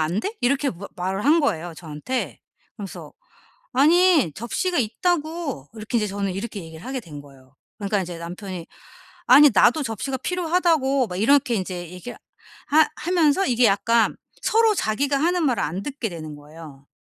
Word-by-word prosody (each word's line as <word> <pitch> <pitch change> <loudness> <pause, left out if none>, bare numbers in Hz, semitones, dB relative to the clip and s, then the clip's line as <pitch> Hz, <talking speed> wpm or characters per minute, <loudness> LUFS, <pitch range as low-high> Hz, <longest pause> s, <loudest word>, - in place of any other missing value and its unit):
안 165 +6 0
돼?" 420 - -4
이렇게 275 +3 +1
마 195 +3 -9
말을 190 +4 -2
한 315 +3 +5
거예요 175 - -1
저한테. 160 - -5 0.4
그러면서 200 -5 -8 0.6
"아니 315 - +4
접시가 345 - -2
있다고." 305 - -2
이렇게 220 +2 -2
이제 215 - +1
저는 200 -1 -2
이렇게 205 +1 -5
얘기를 160 0 -11
하게 260 0 -3
된 150 -8 -10
거예요. 135 -2 -19 0.2
그러니까 200 -1 0
이제 175 -1 -7
남편이 175 0 -7 0.6
"아니 285 +3 +8
나도 315 - +4
접시가 260 +3 -3
필요하다고." 325 -5 +1
막 180 - -6
이렇게 255 +4 +3
인제 180 -3 -4
얘기 180 +7 -8 0.6
하 310 +1 +5
하면서 340 +1 +2
이게 245 -1 +3
약간 220 +3 +2 0.3
서로 445 -1 +3
자기가 275 - 0
하는 345 +4 +1
말을 250 -3 0
안 175 +6 -3
듣게 265 -5 -4
되는 155 -3 -8
거예요. 145 -2 -13
230 Hz, 355 characters per minute, -23 LUFS, 180-290 Hz, 0.6 s, 아니